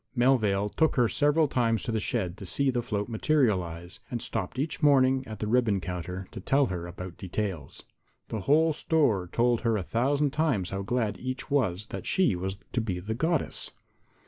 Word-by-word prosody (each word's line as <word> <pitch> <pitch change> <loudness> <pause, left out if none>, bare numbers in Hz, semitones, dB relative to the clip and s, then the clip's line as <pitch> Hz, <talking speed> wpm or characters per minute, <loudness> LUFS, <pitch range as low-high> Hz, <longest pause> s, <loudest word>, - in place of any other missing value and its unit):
Melvale 110 -6 +3
took 160 +8 +1
her 125 -4 +4
several 150 +5 +3
times 115 -4 +1
to 120 - -2
the 110 - 0
shed 95 -5 -2
to 100 - -8
see 140 +7 +1
the 120 -1 0
float 105 -4 -2
materialize, 100 - 0
and 120 - -3
stopped 115 - -3
each 150 +6 -2
morning 135 -3 +4
at 110 0 -7
the - - -3
ribbon 110 -3 +2
counter 90 +1 -5
to - - -7
tell 135 +8 +2
her 90 -6 -4
about 90 0 -8
details. 95 -6 -4 0.5
The 110 - -3
whole 155 - +3
store 120 - +1
told 120 0 +2
her 115 -3 +1
a 95 - -2
thousand 140 +7 +1
times 135 - 0
how 95 0 -2
glad 105 -1 -1
each 130 +2 -5
was 110 -9 +1
that - - -5
she 185 - +3
was 95 +2 -4 0.2
to 120 - +1
be 95 -5 -3
the 105 +5 -4
Goddess. 160 +6 -1
115 Hz, 190 wpm, -28 LUFS, 95-135 Hz, 0.5 s, her